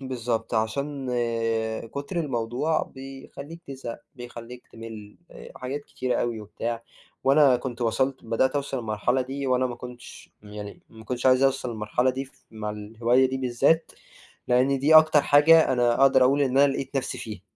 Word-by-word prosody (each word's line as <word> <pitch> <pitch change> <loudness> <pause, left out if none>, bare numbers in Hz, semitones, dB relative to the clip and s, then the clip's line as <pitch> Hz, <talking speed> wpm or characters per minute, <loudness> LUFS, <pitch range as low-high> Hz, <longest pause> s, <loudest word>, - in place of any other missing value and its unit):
بالضبط، 120 -3 -3
عشان 135 +5 -2 0.9
كُتر 145 +6 -3
الموضوع 135 +2 -1
بيخلّيك 135 +4 -10
تزهق، 130 -4 -7 0.2
بيخلّيك 120 0 -10
تِمِل 110 -2 -10 0.4
حاجات 130 +3 -4
كتير 130 -3 -2
أوي 115 -2 -2
وبتاع، 115 +2 -5 0.4
وأنا 135 -1 +5
كنت 125 0 -6
وصَلت 130 +4 0
بدأت 115 +3 +1
أوصَل 140 -1 -2
المرحلة 115 +3 0
دي، 135 +2 -4
وأنا 130 0 +2
ما 125 - -5
كنتش 125 0 -11
يعني 105 -1 -9
ما 110 -1 -14
كنتش 125 +2 -2
عايز 130 0 +5
أوصَل 135 -2 +1
المرحلة 115 +3 0
دي 135 +1 -4
ف 135 - -23
مع 110 -1 -5
الهواية 115 +5 +1
دي 130 - -3
بالذات، 135 +6 +1 0.6
لإن 130 +3 +3
دي 145 +4 +3
أكتر 155 -2 +7
حاجة 155 +3 +6
أنا 120 -1 +2
أقدر 135 -1 +6
أقول 140 +3 +3
إن 135 -1 +1
أنا 140 0 +5
لقيت 135 +1 -4
نَفْسي 135 - -3
فيها. 105 -4 -8
130 Hz, 155 wpm, -25 LUFS, 115-135 Hz, 0.9 s, أكتر